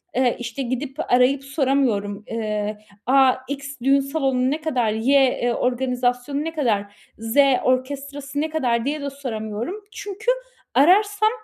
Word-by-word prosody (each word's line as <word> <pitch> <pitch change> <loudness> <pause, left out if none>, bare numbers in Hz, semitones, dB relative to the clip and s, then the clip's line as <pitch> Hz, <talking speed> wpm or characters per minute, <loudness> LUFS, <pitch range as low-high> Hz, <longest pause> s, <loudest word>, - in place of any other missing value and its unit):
Eee, 250 -1 +2
işte 240 +3 -5
gidip, 260 +4 -4
arayıp 260 +2 +4
soramıyorum: 260 -8 0
"Eee, 215 -2 -2 0.3
a, 265 0 +5 0.2
X 280 0 -5
düğün 275 +1 +5
salonu 270 -3 0
ne 310 +2 -2
kadar? 250 -9 0
Y, 260 +6 +3
e 245 -1 0
organizasyonu 250 +2 -1
ne 325 +1 -4
kadar? 210 -9 -1 0.2
Z 225 +3 -4 0.3
orkestrası 280 +2 -2
ne 315 - -1
kadar?" 245 -6 0
diye 295 +1 -2
de 280 - -3
soramıyorum. 235 - -5 0.2
Çünkü 415 +4 -2 0.4
ararsam 410 +7 +4
265 Hz, 135 wpm, -22 LUFS, 240-285 Hz, 0.4 s, a